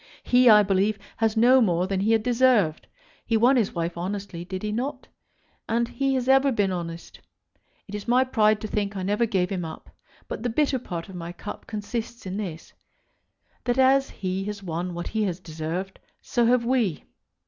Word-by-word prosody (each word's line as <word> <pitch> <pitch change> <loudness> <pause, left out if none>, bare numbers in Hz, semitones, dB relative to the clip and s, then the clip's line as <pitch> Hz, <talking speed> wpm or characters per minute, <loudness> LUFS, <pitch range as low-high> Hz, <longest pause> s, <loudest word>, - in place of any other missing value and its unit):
He, 250 0 +5
I 210 -1 +8
believe, 200 +2 +1 0.2
has 225 0 +1
no 250 +3 +6
more 180 -5 +2
than 190 0 -1
he 210 +3 +1
has 225 - +3
deserved. 235 -8 +2 0.4
He 225 - +1
won 245 +5 +5
his 225 -7 +1
wife 170 0 -2
honestly; 185 0 -5
did 185 +2 -6
he 210 - -2
not? 260 +5 -3 0.6
And 235 +1 +1
he 270 +2 -1
has 255 -1 -1
ever 270 +1 +5
been 205 -5 +1
honest. 170 -2 -6 0.7
It 200 - -11
is 210 +1 -6
my 250 +2 +4
pride 215 -4 +2
to 215 - -4
think 205 -1 -2
I 185 - -3
never 210 +5 +1
gave 185 -3 0
him 185 -3 -2
up. 160 -1 -9 0.4
But - - -5
the 245 - -1
bitter 275 +2 +1
part 170 -8 -6
of 190 - -11
my 170 -1 -6
cup 205 - -9
consists 225 +2 -5
in 185 +1 -4
this, 175 -6 -6 0.9
that 245 0 0
as 270 +1 +4
he 190 0 -3
has 205 -1 -5
won 175 0 -4
what 175 - -4
he 220 - -1
has 180 -2 -3
deserved, 170 +3 -5 0.2
so 240 -1 +1
have 240 -1 +3
we. 235 - 0
210 Hz, 195 wpm, -25 LUFS, 185-240 Hz, 0.9 s, I